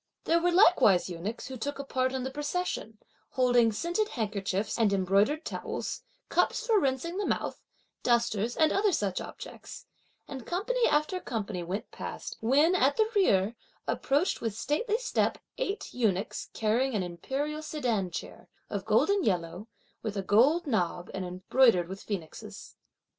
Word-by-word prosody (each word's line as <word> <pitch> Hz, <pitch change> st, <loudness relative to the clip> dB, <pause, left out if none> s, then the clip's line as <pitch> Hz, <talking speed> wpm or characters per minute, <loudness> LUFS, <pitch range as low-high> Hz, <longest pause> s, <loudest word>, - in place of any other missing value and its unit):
There 335 Hz, +1 st, +2 dB
were 355 Hz, +1 st, +2 dB
likewise 340 Hz, -, +5 dB
eunuchs, 185 Hz, +7 st, -5 dB
who 260 Hz, 0 st, -6 dB
took 285 Hz, +5 st, -3 dB
a 280 Hz, -, -4 dB
part 260 Hz, -1 st, 0 dB
in 260 Hz, -1 st, -3 dB
the 265 Hz, -, -3 dB
procession, 295 Hz, -, -3 dB, 0.4 s
holding 245 Hz, -3 st, +4 dB
scented 345 Hz, -, -1 dB
handkerchiefs 205 Hz, -1 st, -2 dB
and 220 Hz, -3 st, +4 dB
embroidered 200 Hz, -, +2 dB
towels, -, -, -4 dB, 0.3 s
cups -, -, +1 dB
for 450 Hz, -3 st, +4 dB
rinsing 280 Hz, +5 st, -1 dB
the 410 Hz, -, 0 dB
mouth, -, -, -2 dB, 0.4 s
dusters 235 Hz, -2 st, +1 dB
and 315 Hz, -1 st, +4 dB
other 410 Hz, 0 st, +3 dB
such 200 Hz, -, -1 dB
objects; -, -, -9 dB, 0.4 s
and 265 Hz, -3 st, -7 dB
company 465 Hz, +7 st, +1 dB
after 305 Hz, +5 st, +1 dB
company 210 Hz, -, -4 dB
went 180 Hz, +5 st, -5 dB
past, -, -, -6 dB
when, 285 Hz, +9 st, +4 dB
at 285 Hz, -6 st, +3 dB
the 440 Hz, 0 st, +2 dB
rear, 215 Hz, -, +3 dB, 0.3 s
approached 285 Hz, +7 st, +1 dB
with 225 Hz, -3 st, -3 dB
stately 420 Hz, +9 st, 0 dB
step -, -, 0 dB, 0.2 s
eight 415 Hz, -5 st, -3 dB
eunuchs 215 Hz, -4 st, -1 dB
carrying 230 Hz, +4 st, +1 dB
an 195 Hz, -, +1 dB
imperial 270 Hz, -, -3 dB
sedan 245 Hz, -, -1 dB
chair, 170 Hz, -, -7 dB, 0.2 s
of -, -, -3 dB
golden 400 Hz, -2 st, +3 dB
yellow, 180 Hz, -, -1 dB, 0.3 s
with 215 Hz, -2 st, -4 dB
a 195 Hz, -, -1 dB
gold 265 Hz, -, +4 dB
knob 180 Hz, -, -1 dB
and 190 Hz, -, -3 dB
embroidered 180 Hz, +1 st, +3 dB
with 190 Hz, +3 st, -7 dB
phoenixes. 180 Hz, -7 st, -7 dB
245 Hz, 155 wpm, -29 LUFS, 200-315 Hz, 0.4 s, likewise